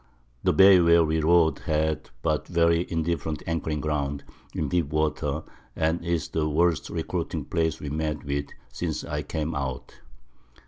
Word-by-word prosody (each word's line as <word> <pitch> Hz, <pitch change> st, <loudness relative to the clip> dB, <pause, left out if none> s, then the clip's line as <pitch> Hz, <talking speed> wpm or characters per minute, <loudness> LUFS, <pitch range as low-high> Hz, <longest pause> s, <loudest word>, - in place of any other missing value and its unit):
The -, -, +3 dB
Bay 95 Hz, +4 st, +7 dB
where 85 Hz, -1 st, +5 dB
we 80 Hz, +1 st, 0 dB
rode 80 Hz, 0 st, +4 dB
had 80 Hz, -1 st, -1 dB
but 80 Hz, -2 st, 0 dB
very 85 Hz, 0 st, +2 dB
indifferent 80 Hz, -1 st, -2 dB
Anchoring 80 Hz, -2 st, -2 dB
Ground, 70 Hz, -2 st, -2 dB, 0.3 s
in -, -, -2 dB
deep 85 Hz, -4 st, +1 dB
Water, 75 Hz, +1 st, -1 dB, 0.3 s
and 80 Hz, +2 st, 0 dB
is 85 Hz, -1 st, -1 dB
the 75 Hz, -1 st, -1 dB
worst 80 Hz, 0 st, +1 dB
recruiting -, -, -3 dB
Place 80 Hz, -3 st, -1 dB
we 75 Hz, -, -5 dB
met 75 Hz, -1 st, -2 dB
with 70 Hz, 0 st, -2 dB, 0.3 s
since -, -, -3 dB
I 75 Hz, 0 st, -3 dB
came 80 Hz, +1 st, -3 dB
out. 65 Hz, -4 st, -5 dB
80 Hz, 150 wpm, -26 LUFS, 75-85 Hz, 0.3 s, Bay